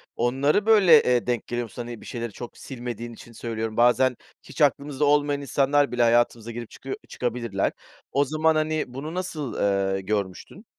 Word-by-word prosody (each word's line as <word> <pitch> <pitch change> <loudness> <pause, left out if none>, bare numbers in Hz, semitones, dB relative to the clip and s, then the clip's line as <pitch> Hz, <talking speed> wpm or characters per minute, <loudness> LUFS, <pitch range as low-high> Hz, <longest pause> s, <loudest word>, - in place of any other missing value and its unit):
onları, 135 - +1
böyle, 190 -9 +7
eee, 125 -1 +1
denk 120 -3 -1
geliyor 120 0 -2
musun? 120 +2 -8
Hani, 120 -1 -8
bir - - -13
şeyleri 120 -2 -5
çok 120 +4 -9
silmediğin 120 -2 -6
için 115 - -13
söylüyorum. 115 -1 -4
Bazen 125 +1 +4 0.3
hiç - - -8
aklımızda 145 0 +2
olmayan 145 0 +2
insanlar 140 0 +2
bile 120 0 0
hayatımıza 115 -1 +2
girip 120 -1 -7
çıkıyo 135 - -6
çıkabilirler. 115 -5 -2 0.4
O 140 +1 +2
zaman, 155 +2 +2
hani, 155 0 0
bunu 140 +6 -7
nasıl, 170 -7 -4 0.4
eee, 95 - -3
görmüştün? 100 - -4
125 Hz, 165 wpm, -25 LUFS, 120-145 Hz, 0.4 s, böyle